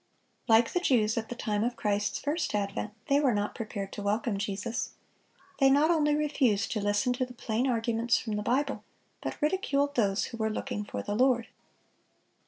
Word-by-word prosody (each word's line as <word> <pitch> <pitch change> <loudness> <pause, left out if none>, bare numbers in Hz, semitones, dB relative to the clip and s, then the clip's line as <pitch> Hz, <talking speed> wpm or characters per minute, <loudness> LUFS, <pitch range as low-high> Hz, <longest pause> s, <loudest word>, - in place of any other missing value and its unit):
Like 230 0 +4
the 360 - +2
Jews 225 -10 +2
at 225 -1 -3
the 245 - -4
time 210 -3 -1
of 240 +1 -1
Christ's 205 -1 0
first 300 -3 -1
advent, 205 +1 -2
they 280 0 +4
were 265 -6 +2
not 205 0 -1
prepared 205 -3 -5
to - - -5
welcome 205 +1 0
Jesus. 205 +3 -3 0.7
They 270 -1 +6
not 290 +4 +4
only 300 -3 +3
refused 270 -8 +1
to 215 - -1
listen 205 +5 +1
to 255 +1 -1
the 250 - -12
plain 235 +2 -1
arguments 235 -1 +1
from 220 - -4
the 210 - -1
Bible, 275 +5 0 0.4
but - - -5
ridiculed 285 -4 +1
those 205 -6 +1
who - - -5
were 220 -1 0
looking 210 -1 -3
for - - -5
the 205 - -3
Lord. 245 0 +2
230 Hz, 190 wpm, -29 LUFS, 210-270 Hz, 0.7 s, They